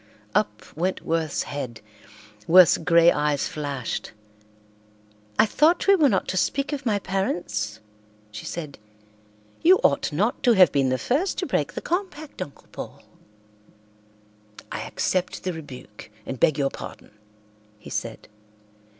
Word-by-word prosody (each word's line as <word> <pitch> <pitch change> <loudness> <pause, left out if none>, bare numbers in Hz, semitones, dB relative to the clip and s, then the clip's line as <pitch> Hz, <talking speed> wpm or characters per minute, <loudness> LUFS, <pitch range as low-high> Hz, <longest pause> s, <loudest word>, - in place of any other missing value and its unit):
Up 105 0 0
went 180 +4 -1
Worth's 160 -2 -1
head. 130 -5 -6 0.7
Worth's 180 -1 +7
grey 170 +1 +5
eyes 150 -1 0
flashed. 140 -5 -4 1.2
"I - - +6
thought 310 - +3
we 395 - +6
were 310 -7 +5
not 195 -5 0
to 185 - -1
speak 275 +9 0
of 275 -3 -4
my 210 -2 +2
parents?" 110 - -2 0.5
she 105 +1 -8
said. 155 -7 -6 0.8
"You 370 +3 +7
ought 140 - +2
not 200 +10 0
to 240 - +5
have 185 -7 +6
been 135 -2 +2
the 130 - +1
first 300 - 0
to - - -1
break - - -1
the - - -5
compact, 340 - -4
Uncle 145 -6 -8
Paul." - - -8 1.7
"I - - -3
accept 185 -1 -1
the 185 - -2
rebuke 130 -9 -10 0.2
and 130 - -5
beg 155 -3 +3
your 140 -1 +1
pardon," - - -10 0.7
he 105 - -12
said. - - -5
165 Hz, 140 wpm, -24 LUFS, 140-215 Hz, 1.7 s, Worth's